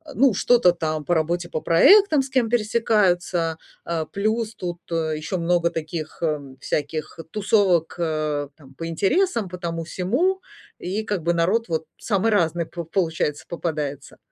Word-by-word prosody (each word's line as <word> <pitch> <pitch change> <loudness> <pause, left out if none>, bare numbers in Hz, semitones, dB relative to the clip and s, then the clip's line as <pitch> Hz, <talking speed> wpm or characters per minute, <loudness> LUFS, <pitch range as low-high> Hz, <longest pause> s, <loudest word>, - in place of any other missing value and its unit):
ну, 265 -2 +4
что-то 235 -1 +4
там 155 -3 -3
по 175 - 0
работе, 170 +2 0
по 155 - -2
проектам, 315 - +6
с 265 - -8
кем 255 -4 +1
пересекаются. 195 -7 +1 0.3
Э, 165 -2 -2
плюс 220 +2 -1
тут 175 -1 -5
ещё 160 0 -2
много 170 0 +2
таких, 160 0 -5
э, 155 -2 +1 0.2
всяких 155 +2 -3
тусовок, 195 -5 +2
э, 155 -3 -1
там, 135 -3 -17
по 165 +4 -5
интересам, 210 - +1
по 180 - -7
тому-сему. 180 - -1 0.4
И 195 +5 -3
как 205 -6 -3
бы 170 +1 +2
народ 190 +8 +1
вот 160 -1 -2
самый 215 +1 0
разный 170 -4 +1
по 170 +1 -7
получается 160 -4 -1
попадается. 150 -5 -4
175 Hz, 145 wpm, -23 LUFS, 160-210 Hz, 0.4 s, проектам